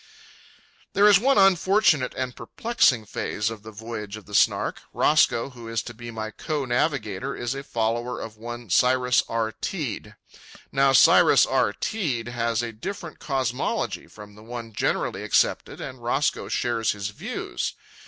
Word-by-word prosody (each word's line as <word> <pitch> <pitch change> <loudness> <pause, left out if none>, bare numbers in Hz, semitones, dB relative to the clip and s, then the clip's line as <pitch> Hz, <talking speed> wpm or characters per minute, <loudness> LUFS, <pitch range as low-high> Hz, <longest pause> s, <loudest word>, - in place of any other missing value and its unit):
There 205 +1 +5
is 205 -3 +7
one 270 +5 +3
unfortunate 195 -6 +4
and 125 -1 -3
perplexing 150 - +1
phase 105 +1 -2
of 110 -2 -8
the 110 - -10
voyage 110 -1 -7
of 110 - -13
the 105 - -13
Snark. - - +2
Roscoe, 115 +4 +3
who 120 -2 -11
is 115 0 -2
to 120 - -8
be 120 +1 -9
my 110 -1 -5
co 150 +4 -3
navigator, 125 - -1
is 120 +1 -3
a 135 - -5
follower 120 -2 -2
of 110 -1 -7
one, 120 -1 -8
Cyrus 125 +2 +4
R. 115 -1 -1
Teed. 110 - -5 0.6
Now 135 0 +4
Cyrus 135 - +6
R. - - +2
Teed 120 - -2
has 115 -1 -1
a 120 - -4
different 185 - -7
cosmology 130 -4 -2
from 105 -1 -13
the 105 - -15
one 115 0 -8
generally - - -1
accepted, - - +1
and 130 -2 -7
Roscoe 130 +5 0
shares 115 -2 0
his 100 -1 -4
views. 105 - -4
120 Hz, 155 wpm, -25 LUFS, 110-135 Hz, 0.6 s, is